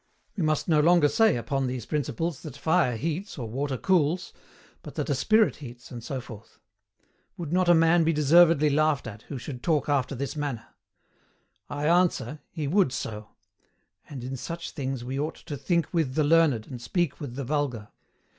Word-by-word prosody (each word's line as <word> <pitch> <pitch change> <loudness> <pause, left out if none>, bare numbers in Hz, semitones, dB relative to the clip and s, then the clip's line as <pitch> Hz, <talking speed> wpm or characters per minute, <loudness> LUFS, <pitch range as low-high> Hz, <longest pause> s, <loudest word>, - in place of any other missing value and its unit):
We 195 - -3
must 155 -2 0
no 155 -3 +4
longer 165 0 +5
say 220 +7 +3
upon 130 +3 -1
these 125 -2 -4
principles 150 +1 -2
that 145 -4 -9
fire 160 -4 +2
heats, 165 - -4
or 120 -4 -4
water 135 +4 -2
cools, 175 +1 +1 0.5
but - - -10
that - - -2
a - - +3
Spirit 215 0 +3
heats, 125 -4 -11
and 120 -2 -7
so 135 +1 -4
forth. 110 -4 -12 0.8
Would 170 -2 -5
not 180 -1 +3
a 175 - +7
man 165 +1 +4
be 160 - +2
deservedly 155 0 +5
laughed 155 0 +2
at, 110 -2 -8
who 140 - -4
should 125 0 -7
talk 155 -4 0
after 140 -1 0
this 140 +4 -4
manner? 145 -6 -3 1.0
I 145 +1 -3
ANSWER, 165 -5 +2
he 150 -3 -4
would 180 -2 +3
so; 105 -4 -5 0.8
in 130 -2 -6
such 165 +5 -6
things 135 -4 -4
we 130 +3 -4
ought 150 +2 -2
to 155 -3 -7
THINK 170 +4 -1
WITH 155 -6 0
THE 155 - +3
LEARNED, 145 -7 +3
AND 125 -3 -8
SPEAK 170 +4 -1
WITH 130 -4 -6
THE 140 - -4
VULGAR. 130 -7 -2
145 Hz, 185 wpm, -27 LUFS, 130-165 Hz, 1.0 s, a